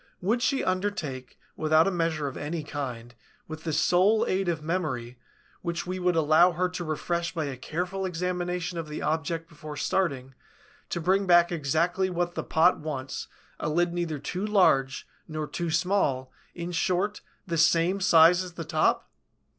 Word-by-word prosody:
Would 220 Hz, +7 st, 0 dB
she 255 Hz, +2 st, +1 dB
undertake, 185 Hz, -, -3 dB, 0.2 s
without 155 Hz, +1 st, +3 dB
a -, -, +2 dB
measure 165 Hz, -4 st, -1 dB
of 135 Hz, -, -6 dB
any 155 Hz, +2 st, -4 dB
kind, 125 Hz, -5 st, -6 dB, 0.3 s
with 155 Hz, +1 st, -8 dB
the 160 Hz, -, -1 dB
sole 180 Hz, +8 st, +3 dB
aid 190 Hz, -1 st, 0 dB
of 160 Hz, -3 st, -2 dB
memory, 130 Hz, -8 st, -3 dB, 0.4 s
which 170 Hz, -1 st, -3 dB
we 185 Hz, +1 st, -4 dB
would 180 Hz, -1 st, +1 dB
allow 160 Hz, +3 st, +5 dB
her 180 Hz, +2 st, +1 dB
to 180 Hz, -1 st, -5 dB
refresh 170 Hz, +2 st, -2 dB
by 160 Hz, -2 st, -1 dB
a 140 Hz, -2 st, -4 dB
careful 180 Hz, +8 st, -3 dB
examination 180 Hz, -1 st, -2 dB
of 165 Hz, -, -5 dB
the 150 Hz, -, -5 dB
object 160 Hz, +1 st, -1 dB
before 155 Hz, -2 st, -9 dB
starting, 135 Hz, -9 st, -1 dB, 0.6 s
to -, -, -2 dB
bring 190 Hz, +4 st, +1 dB
back 175 Hz, -1 st, +5 dB
exactly 170 Hz, +4 st, 0 dB
what 175 Hz, -1 st, -1 dB
the -, -, -3 dB
pot 170 Hz, +3 st, +3 dB
wants, 140 Hz, -4 st, -5 dB, 0.3 s
a -, -, -2 dB
lid 175 Hz, +2 st, +1 dB
neither 170 Hz, -3 st, -2 dB
too 180 Hz, +7 st, -4 dB
large 180 Hz, -11 st, +2 dB, 0.2 s
nor 155 Hz, -1 st, -3 dB
too 170 Hz, +3 st, -4 dB
small, 160 Hz, -7 st, +1 dB, 0.2 s
in 170 Hz, 0 st, -5 dB
short, 185 Hz, +4 st, 0 dB, 0.2 s
the 170 Hz, -, -2 dB
same 170 Hz, +4 st, +3 dB
size 170 Hz, 0 st, +6 dB
as 180 Hz, -2 st, -9 dB
the 165 Hz, -2 st, -6 dB
top?" 155 Hz, 0 st, +1 dB
170 Hz, 170 wpm, -27 LUFS, 155-180 Hz, 0.6 s, size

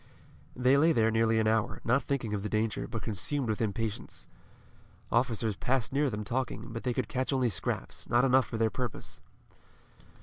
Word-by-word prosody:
They 130 Hz, +2 st, +4 dB
lay 160 Hz, +3 st, +5 dB
there 110 Hz, -3 st, +3 dB
nearly 115 Hz, 0 st, +3 dB
an 110 Hz, -, +2 dB
hour, 110 Hz, 0 st, +1 dB
not 125 Hz, +4 st, +3 dB
thinking 125 Hz, -6 st, -2 dB
of 100 Hz, -, -1 dB
the 105 Hz, -, -3 dB
danger, 110 Hz, +1 st, -1 dB
but 115 Hz, -2 st, -5 dB
consumed 120 Hz, +5 st, -1 dB
with 110 Hz, -, -1 dB
impatience. 110 Hz, 0 st, -3 dB, 0.9 s
Officers 115 Hz, -3 st, +1 dB
passed 130 Hz, 0 st, -1 dB
near 145 Hz, 0 st, +2 dB
them 105 Hz, -2 st, -4 dB
talking, 120 Hz, 0 st, -3 dB
but 115 Hz, -, -4 dB
they 125 Hz, -, -1 dB
could 130 Hz, -4 st, -1 dB
catch 130 Hz, -1 st, -1 dB
only 130 Hz, -3 st, +2 dB
scraps, 90 Hz, -, -3 dB
not 120 Hz, +3 st, +4 dB
enough 130 Hz, 0 st, +4 dB
for 115 Hz, -, -4 dB
their 110 Hz, -1 st, +2 dB
purpose. 125 Hz, +1 st, -5 dB
115 Hz, 180 wpm, -30 LUFS, 110-130 Hz, 0.9 s, lay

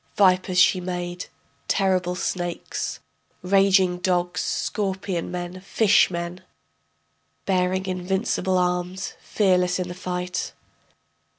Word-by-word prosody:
Vipers 185 Hz, -2 st, +3 dB
she 185 Hz, +1 st, +5 dB
made, 175 Hz, 0 st, -4 dB, 0.4 s
terrible 185 Hz, -2 st, +1 dB
snakes....... 175 Hz, -1 st, -3 dB, 0.4 s
raging 190 Hz, -1 st, +4 dB
dogs, 180 Hz, -1 st, 0 dB
scorpion 190 Hz, -4 st, -2 dB
men... 180 Hz, 0 st, -5 dB
fish 200 Hz, +1 st, +4 dB
men.... 170 Hz, 0 st, -5 dB, 1.0 s
Bearing 185 Hz, 0 st, +1 dB
invincible 190 Hz, +1 st, 0 dB
arms, 180 Hz, +1 st, -1 dB
fearless 180 Hz, -3 st, +2 dB
in 180 Hz, -1 st, -2 dB
the -, -, -5 dB
fight. 180 Hz, 0 st, -4 dB
180 Hz, 95 wpm, -24 LUFS, 180-190 Hz, 1.0 s, she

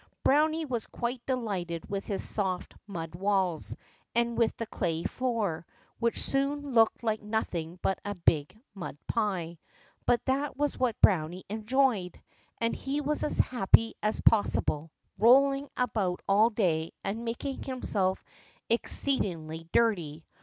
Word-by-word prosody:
Browny 310 Hz, +3 st, +3 dB
was 240 Hz, -6 st, -3 dB
quite 240 Hz, 0 st, -4 dB
delighted 195 Hz, -10 st, -2 dB
with 200 Hz, 0 st, -4 dB
his 200 Hz, -, -2 dB
soft 190 Hz, -4 st, -2 dB
mud 165 Hz, -5 st, -6 dB
walls 190 Hz, -2 st, 0 dB, 0.4 s
and 235 Hz, 0 st, +1 dB
with 230 Hz, -1 st, +1 dB
the 230 Hz, -, -3 dB
clay 170 Hz, -6 st, -2 dB
floor, 225 Hz, -11 st, -1 dB, 0.4 s
which 235 Hz, 0 st, +1 dB
soon 280 Hz, 0 st, +1 dB
looked 225 Hz, 0 st, +4 dB
like 220 Hz, -2 st, 0 dB
nothing 180 Hz, -6 st, -3 dB
but 195 Hz, -, +1 dB
a 205 Hz, 0 st, -4 dB
big 165 Hz, +1 st, +1 dB
mud 195 Hz, -7 st, -7 dB
pie. 180 Hz, -7 st, -2 dB, 0.5 s
But 245 Hz, -, +2 dB
that 275 Hz, +1 st, -1 dB
was 290 Hz, 0 st, 0 dB
what 250 Hz, -3 st, 0 dB
Browny 180 Hz, -1 st, +3 dB
enjoyed, 220 Hz, -3 st, +1 dB, 0.4 s
and 230 Hz, 0 st, 0 dB
he 275 Hz, +2 st, -2 dB
was 295 Hz, +1 st, -1 dB
as -, -, -1 dB
happy 225 Hz, -1 st, +4 dB
as 215 Hz, +1 st, 0 dB
possible, 165 Hz, -7 st, +2 dB, 0.3 s
rolling 275 Hz, +4 st, +5 dB
about 210 Hz, -8 st, -1 dB
all 210 Hz, +3 st, +5 dB
day 165 Hz, -8 st, 0 dB
and 215 Hz, +4 st, -3 dB
making 240 Hz, +4 st, -4 dB
himself 200 Hz, -8 st, -1 dB, 0.5 s
exceedingly 165 Hz, -, +1 dB
dirty. 170 Hz, -9 st, +1 dB
215 Hz, 135 wpm, -29 LUFS, 180-250 Hz, 0.5 s, rolling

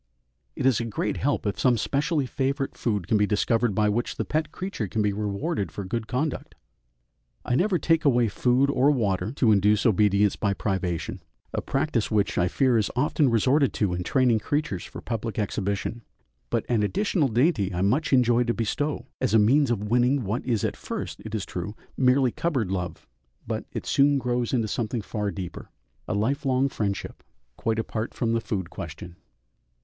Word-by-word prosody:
It -, -, -3 dB
is 130 Hz, -5 st, +4 dB
a 115 Hz, -, -2 dB
great 110 Hz, -3 st, -2 dB
help 145 Hz, -3 st, 0 dB
if 100 Hz, -, -2 dB
some 125 Hz, -2 st, +3 dB
specially 145 Hz, +5 st, 0 dB
favourite 135 Hz, +1 st, -2 dB
food 105 Hz, -7 st, -2 dB
can 110 Hz, -, +3 dB
be 105 Hz, 0 st, +2 dB
discovered 110 Hz, +1 st, +1 dB
by 105 Hz, +1 st, +3 dB
which 115 Hz, +3 st, -1 dB
the -, -, -2 dB
pet 155 Hz, 0 st, -1 dB
creature 185 Hz, -, -4 dB
can 110 Hz, +3 st, -1 dB
be 105 Hz, -1 st, +1 dB
rewarded 105 Hz, -, -2 dB
for 100 Hz, -, -5 dB
good 110 Hz, +3 st, -3 dB
conduct. 130 Hz, +5 st, -3 dB, 0.9 s
I -, -, -1 dB
never 185 Hz, +8 st, +2 dB
take 165 Hz, -1 st, +2 dB
away 120 Hz, -5 st, +4 dB
food 125 Hz, +6 st, +2 dB
or 135 Hz, +1 st, +3 dB
water 105 Hz, -7 st, 0 dB
to 125 Hz, -6 st, +3 dB
induce 105 Hz, +1 st, +3 dB
obedience 105 Hz, -2 st, +3 dB
by 100 Hz, -2 st, 0 dB
privation 95 Hz, -5 st, -2 dB, 0.3 s
a -, -, -1 dB
practice 135 Hz, -5 st, -1 dB
which 105 Hz, -4 st, +1 dB
I 90 Hz, -, +3 dB
fear 125 Hz, +4 st, +2 dB
is 105 Hz, -, 0 dB
often 145 Hz, +2 st, +2 dB
resorted 130 Hz, +5 st, +3 dB
to 100 Hz, -5 st, 0 dB
in 90 Hz, -, -2 dB
training 125 Hz, +3 st, +2 dB
creatures 145 Hz, -, -2 dB
for -, -, -9 dB
public 115 Hz, -2 st, -4 dB
exhibition 100 Hz, +2 st, -2 dB, 0.5 s
but -, -, -1 dB
an 120 Hz, -3 st, +1 dB
additional 175 Hz, -, +1 dB
dainty 120 Hz, -, +2 dB
I 90 Hz, +1 st, -1 dB
much 130 Hz, +11 st, +1 dB
enjoy 125 Hz, -2 st, +4 dB
to 120 Hz, -, 0 dB
bestow, 145 Hz, +6 st, -2 dB
as 130 Hz, -4 st, +1 dB
a -, -, +8 dB
means 130 Hz, +6 st, +4 dB
of 105 Hz, -3 st, -1 dB
winning 125 Hz, +2 st, +3 dB
what 105 Hz, +4 st, -2 dB
is 115 Hz, -5 st, 0 dB
at -, -, -1 dB
first, -, -, -5 dB
it 110 Hz, 0 st, -5 dB
is 105 Hz, -, -2 dB
true, 95 Hz, +4 st, -5 dB, 0.2 s
merely 130 Hz, -1 st, +3 dB
cupboard 130 Hz, -, -1 dB
love, 90 Hz, -3 st, -4 dB, 0.4 s
but -, -, -3 dB
it -, -, -5 dB
soon 140 Hz, +1 st, +3 dB
grows 125 Hz, -2 st, -1 dB
into 115 Hz, -4 st, +1 dB
something 115 Hz, +1 st, -2 dB
far 105 Hz, -2 st, -2 dB
deeper, 95 Hz, -3 st, -7 dB, 0.4 s
a -, -, -1 dB
lifelong 135 Hz, +4 st, +1 dB
friendship, 100 Hz, -5 st, -3 dB, 0.3 s
quite 115 Hz, -2 st, -1 dB
apart 110 Hz, 0 st, -3 dB
from 115 Hz, -2 st, 0 dB
the 115 Hz, -, +1 dB
food 95 Hz, -5 st, -3 dB
question. 85 Hz, 0 st, -8 dB
115 Hz, 185 wpm, -26 LUFS, 105-135 Hz, 0.9 s, a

